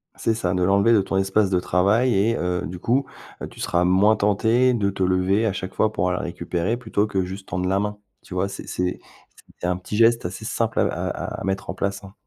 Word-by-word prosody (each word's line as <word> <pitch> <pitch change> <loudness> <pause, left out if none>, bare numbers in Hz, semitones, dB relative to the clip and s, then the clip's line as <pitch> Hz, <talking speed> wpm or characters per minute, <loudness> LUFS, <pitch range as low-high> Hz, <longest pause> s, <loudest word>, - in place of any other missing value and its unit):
C'est 115 - 0
ça. 95 -5 -1
De 90 0 0
l'enlever 100 +4 +4
de 105 - +5
ton 95 0 -2
espace 95 +1 +2
de 90 -2 +2
travail 105 +9 +2
et 110 +4 +2
heu, 90 0 -1
du 90 +1 -7
coup, 130 +8 +1 0.4
heu, - - -4
tu - - -15
seras 85 0 +1
moins 95 +4 +4
tenté 110 +5 +2
de 100 -4 +1
te 95 -1 -2
lever 95 +4 +2
à 100 - 0
chaque 95 0 -5
fois 110 - +1
pour 90 -3 0
aller 90 - -1
le - - -5
récupérer 90 +4 -2
plutôt 110 -3 -1
que 95 -3 -1
juste 95 +2 -7
tendre 90 0 -1
la 95 +1 +2
main. 105 0 -2 0.3
Tu - - -10
vois, 95 +2 0
c'est - - -8
c'est 90 0 -2 0.6
c'est - - -1
un 90 0 0
petit 95 +3 -5
geste 115 -1 +4
assez 95 +5 -5
simple 115 0 -1
à - - +4
à - - -4
à - - -5
mettre 95 0 -3
en 95 - -1
place, 100 +1 -3
hein. 95 -1 -12
100 Hz, 250 wpm, -23 LUFS, 90-110 Hz, 0.6 s, de